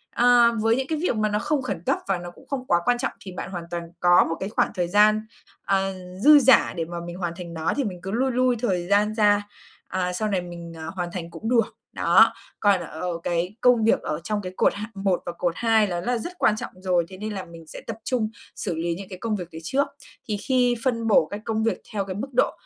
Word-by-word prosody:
Ờ, 240 -1 +6
với 225 +1 +3
những 265 +1 -2
cái 315 0 -1
việc 355 - +1
mà 215 0 +1
nó 210 0 0
không 290 +5 0
khẩn 245 -9 -4
cấp, - - +2
và 195 -2 +1
nó 175 0 -8
cũng - - -19
không 265 -2 -4
quá 175 - +4
quan 245 0 +3
trọng 260 +3 -2
thì 190 - -8
bạn 185 - -6
hoàn 175 -3 -5
toàn 170 0 -3 0.2
có 175 0 +6
một 165 - -1
cái 190 - -3
khoảng 215 - +1
thời 175 -2 0
gian, 210 +2 +5 0.4
ờ, 195 0 +1 0.3
dư 300 0 +9
dả 265 0 +5
để 165 - -1
mà 175 +1 -7
mình 175 - -6
hoàn 175 -2 -3
thành 175 -2 -7
nó 160 0 -1
thì 280 - +1
mình 190 -6 -4
cứ 190 - -4
lui 260 +5 +1
lui 255 0 +2
thời 185 -7 -1
gian 205 +2 +3
ra, 205 -1 +3 0.4
à, 180 -1 -2
sau 215 +4 -1
này 190 -3 0
mình, 170 -1 -9
ờ, 160 0 -6
hoàn 175 -2 -3
thành 170 -2 -6
cũng 220 - -5
được. 230 -3 +2 0.2
Đó, - - +5 0.3
còn 200 -3 +4
ở 170 +1 -4
cái 175 +3 -1
công 245 -3 +5
việc 225 - +3
ở 150 - -3
trong 210 +2 -2
cái 185 -1 -7
cột - - +3
hạng 210 +3 -6
1 195 -2 0
và - - -3
cột 175 0 -1
2 225 -2 +3
đó 175 -2 -2
là 245 +6 0
rất 345 +10 -6
quan 210 - +4
trọng - - -6
rồi, 180 -2 +1
thế 190 - -10
nên 210 +2 -4
là 190 -2 -5
mình 165 -2 -13
sẽ - - -9
tập 225 -2 -4
trung 235 -4 0 0.3
xử 180 -5 -3
lý 165 +1 -1
những 195 +2 -9
cái 185 - -7
công 225 0 -1
việc 180 -4 -5
đấy 160 - -8
trước. 270 - +1 0.4
Thì 210 - 0
khi 250 +2 +2
phân 230 -3 0
bổ 205 -7 +5
cái 205 - -6
công 220 -1 -1
việc 225 - 0
theo 200 -2 -1
cái 190 -1 -5
mức 215 +7 -4
độ 245 - +3
200 Hz, 265 wpm, -24 LUFS, 175-230 Hz, 0.4 s, dư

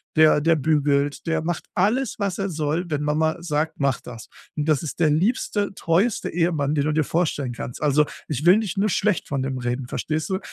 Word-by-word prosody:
der 155 -1 +6
der 165 +2 +3
bügelt, 145 -1 +1
der 165 -1 +1
macht 170 +1 -3
alles, 215 +6 +1
was 200 -3 -1
er 195 - -1
soll, 155 +1 -1
wenn 150 -3 -2
Mama 155 +1 +1
sagt: 155 -1 -1
„Mach 140 -3 +1
das!“ 115 -2 -11 0.3
Und 150 - -1
das 150 -2 +2
ist 160 - -6
der 160 - +5
liebste, 205 +4 0
treueste 190 +6 0
Ehemann, 160 -4 0
den 145 -1 +1
du 150 - 0
dir 155 0 +2
vorstellen 150 -5 -1
kannst. 120 +2 -7
Also, 150 0 +3 0.2
ich 150 0 -3
will 180 +2 +8
nicht 215 -2 -3
nur 205 +2 +2
schlecht 205 -1 0
von 140 -2 -2
dem 135 -1 -3
reden, 125 +1 -3
verstehst 155 +6 -3
du? 190 -1 -1
155 Hz, 210 wpm, -23 LUFS, 145-180 Hz, 0.3 s, will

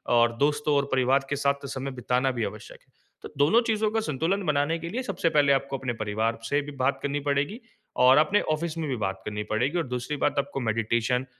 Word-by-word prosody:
और 120 0 +4
दोस्तों 145 +2 +1
और 140 0 +2
परिवार 130 +1 +2
के 145 - 0
साथ 140 0 0
समय 135 0 -4
बिताना 125 +1 0
भी 120 -3 -3
आवश्यक - - -9
है। - - -35 0.3
तो - - -8
दोनों 150 +12 +4
चीज़ों 215 -1 +1
का 225 - +1
संतुलन 180 +2 -1
बनाने 150 +2 +1
के 170 +1 -6
लिए 245 +8 -3
सबसे 170 -8 0
पहले 145 -3 +3
आपको 135 0 -1
अपने 130 -2 -3
परिवार 110 +2 -1
से 145 +1 +2
भी 145 +1 -8
बात 140 +2 +1
करनी 140 +1 -1
पड़ेगी 145 +10 0 0.5
और 130 +2 +7
अपने 155 +7 +4
ऑफ़िस 165 +1 -4
में 160 -2 -2
भी 130 - -1
बात 95 0 -4
करनी 105 0 -3
पड़ेगी 125 +10 0
और 165 -4 -1
दूसरी 125 +4 -3
बात 145 0 +1
आपको 140 0 -3
मेडिटेशन 115 +2 0
140 Hz, 220 wpm, -26 LUFS, 125-150 Hz, 0.5 s, और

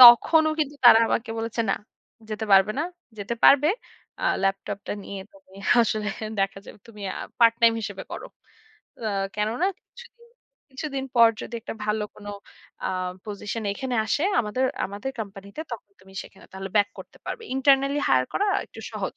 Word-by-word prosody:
তখনও 285 +6 +9
কিন্তু 295 -1 -1
তারা 240 -2 +10
আমাকে 225 0 -1
বলেছে 230 +1 -2
"না - - +3 0.6
যেতে 215 +1 -3
পারবে 195 +2 +6
না। 300 - +1 0.3
যেতে 205 +3 -3
পারবে।" 290 +2 +7 0.5
আ - - 0 0.2
ল্যাপটপটা 195 +1 -2
নিয়ে 200 - -6
তুমি 290 -10 -20 0.3
আসলে 215 -1 -1 0.3
দেখা 195 0 0
যাবে - - -11
তুমি 210 -2 -12
আ - - -7 0.2
পার্টটাইম 230 0 +6
হিসেবে 195 -2 -5
করো। - - -6 0.8
আ - - +1 0.3
কেননা 220 - +1
কিছুদিন, 475 -1 -17 0.4
কিছুদিন 270 0 -4
পর 230 -1 +9
যদি - - -7
একটা 225 - -6
ভালো 210 0 0
কোনো 205 -1 -8 0.6
আ - - 0 0.4
পজিশন 210 +2 -4
এখানে 260 +3 -3
আসে 250 +8 +1 0.2
আমাদের, 235 +4 -1 0.2
আমাদের 200 +7 -5
কোম্পানিতে 200 +5 -8
তখন 215 -3 -7
তুমি 190 0 -17
সেখানে 195 - -16
তাহলে 190 0 -6
ব্যাক 205 -1 +5
করতে - - -11
পারবে। 465 - -4
ইন্টারনালী 275 +1 +4
হাইয়ার 130 -1 +4
করা 410 - +1 0.2
একটু - - -12
সহজ। - - -4
225 Hz, 160 wpm, -25 LUFS, 200-265 Hz, 0.8 s, তারা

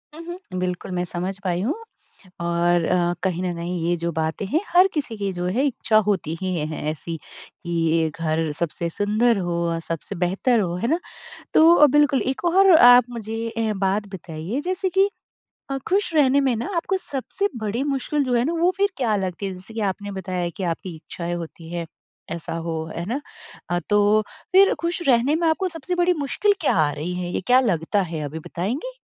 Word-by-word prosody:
उहुँ, 345 +2 -7 0.2
बिल्कुल 180 0 -3
मैं 180 -1 -1
समझ 185 +2 -4
पाई 180 -1 0
हूँ 240 +9 0 0.7
और 170 0 +2
अ, 175 0 +1
कहीं 185 -2 -1
न 180 -1 -1
कहीं 175 +1 -3
ये 175 - +2
जो 170 0 -2
बातें 160 +4 -2
हैं 305 +11 +1
हर 365 +2 +6
किसी 275 -7 -2
की 200 -1 -2
जो 175 0 -3
है 260 +4 +2
इच्छा 235 -4 +1
होती 190 -6 0
ही 185 -1 -1
है 155 0 -3
ऐसी 160 +2 -5
कि 165 0 -2
घर 160 -1 0
सबसे 170 0 -2
सुंदर 215 +5 +2
हो, 170 -2 -1
सबसे 165 +4 -5
बेहतर 195 +7 +1
हो। 175 -3 -1
है 230 +6 -1
ना? 325 - +2 0.6
तो 320 -1 +7
बिल्कुल 290 -1 +3
एक 265 +5 -2
और 380 +3 +5
आप 245 -3 +8
मुझे 225 -1 -4
अ, 225 -1 -1
बात 195 +2 0
बताइए 170 - -4
जैसे 370 +4 -1
कि 385 +2 +4 0.6
अ, 275 - -1
खुश 385 -2 +1
रहने 280 -2 +5
में 265 -3 +2
ना 230 - -3
आपको 360 +3 0
सबसे 375 +4 -2
बड़ी 220 +2 -2
मुश्किल 285 +2 -1
जो 255 -2 0
है 240 0 +3
ना 315 - 0
वो 350 +2 +4
फिर 400 +1 +3
क्या 230 -6 +1
लगती 190 0 -3
है? 190 - -4
जैसे 185 +5 -11
कि 225 - -3
आपने 205 +2 -6
बताया 185 -2 -3
कि 195 - -5
आपकी 170 +1 -7
इच्छाएँ 170 +2 -5
होती 165 -1 -8
हैं, 170 -1 -3 0.5
ऐसा 170 -1 -5
हो। 160 -1 -2
है 170 - -3
ना? 250 +6 -2 0.5
अ, 175 - +1
तो 210 +1 +4 0.3
फिर 390 +1 +6
खुश 340 +2 -1
रहने 250 +3 +4
में 335 +1 0
आपको 365 +4 +1
सबसे 330 +1 -4
बड़ी 355 0 +3
मुश्किल 290 +9 +2
क्या 305 - +2
आ 155 -3 +3
रही 160 +5 -4
है? 180 -1 -3
ये - - -1
क्या 250 +1 +6
लगता 195 -3 +1
है 160 - -3
अभी 150 +2 -5
बताएँगी? 245 - -4
205 Hz, 200 wpm, -23 LUFS, 175-275 Hz, 0.7 s, आप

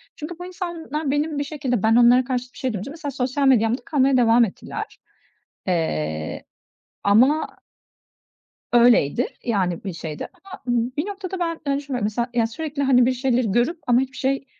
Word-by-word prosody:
Çünkü 320 +3 -7
bu 355 - -6
insanlar 335 -5 -4
benim 295 +1 -1
bir - - 0
şekilde 270 -7 -2
ben 225 +1 +4
onlara 245 +1 +6
karşı 250 +1 -3
bir - - -16
şey 255 -4 -2
duyunca; 205 +7 -5
mesela 305 -2 -5
sosyal 270 +1 0
medyamda 235 -1 +3
kalmaya 270 -3 +3
devam 235 0 +5
ettiler. 195 - -7 0.7
Eee, 80 - -2 0.6
ama 255 +10 +3 1.2
Öyleydi 240 - +4 0.2
yani, 190 -7 -1
bir 190 - -3
şeyde. 160 -2 -6 0.2
Ama 390 - -11
bir 245 +6 -1
noktada 390 -2 -5
ben 335 -2 -2
hani, 280 -1 0
düşünmüyorum. 270 -5 -3 0.2
Mesela, 240 -2 0
sürekli 285 +5 -4
hani, 255 -3 +5
bir 260 - +3
şeyleri 250 -4 0
görüp 245 - +1
ama 245 +1 +4
hiçbir 265 0 -4
şey, 270 +1 -1
255 Hz, 160 wpm, -22 LUFS, 230-290 Hz, 1.2 s, onlara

